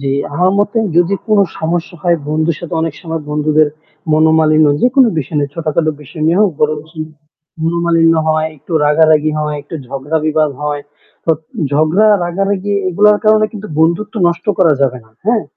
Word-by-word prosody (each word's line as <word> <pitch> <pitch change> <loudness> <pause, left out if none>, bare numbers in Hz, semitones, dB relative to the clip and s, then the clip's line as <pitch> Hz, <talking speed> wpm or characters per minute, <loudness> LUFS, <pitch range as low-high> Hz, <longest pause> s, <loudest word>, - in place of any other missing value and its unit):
জ্বী, 135 -1 -1 0.2
আমার 180 +3 +2
মতে 205 +3 +1 0.2
যদি 175 +3 +3
কোনো 210 -2 +4 0.2
সমস্যা 170 +2 -3
হয় 175 -1 +2
বন্ধুর 155 +1 0
সাথে 170 0 -6
অনেক 160 -2 -2
সময় 165 -2 -5
বন্ধুদের, 150 0 +2 0.4
মনোমালিন্য 155 0 +4
যেকোন 260 +2 +4
বিষয় 150 +1 -4
নিয়ে 145 -1 -2
ছোটখাটো 155 -1 -1
বিষয় 155 +3 -8
নিয়ে 170 +4 +2
হোক 210 -2 +4
বরঞ্চ 150 +1 -1 0.7
মনোমালিন্য 165 0 +2
হয়, 155 0 +1
একটু 170 - -12
রাগারাগি 155 0 +3
হয়, 150 -1 -2
একটু 145 +3 -10
ঝগড়া 140 +5 -3
বিবাদ 155 -1 +1
হয়। 150 -1 -2 0.4
তো - - +1 0.4
ঝগড়া 155 +9 +3 0.2
রাগারাগি 195 +3 -2 0.2
এগুলোর 205 +3 +4
কারণে 215 0 +4
কিন্তু 215 0 -8
বন্ধুত্ব 170 +6 +1
নষ্ট 170 0 -4
করা 170 -5 +4
যাবে 130 -2 +1
না। 110 - -25 0.2
হ্যাঁ? 230 -1 +2
160 Hz, 160 wpm, -14 LUFS, 155-180 Hz, 0.7 s, কোনো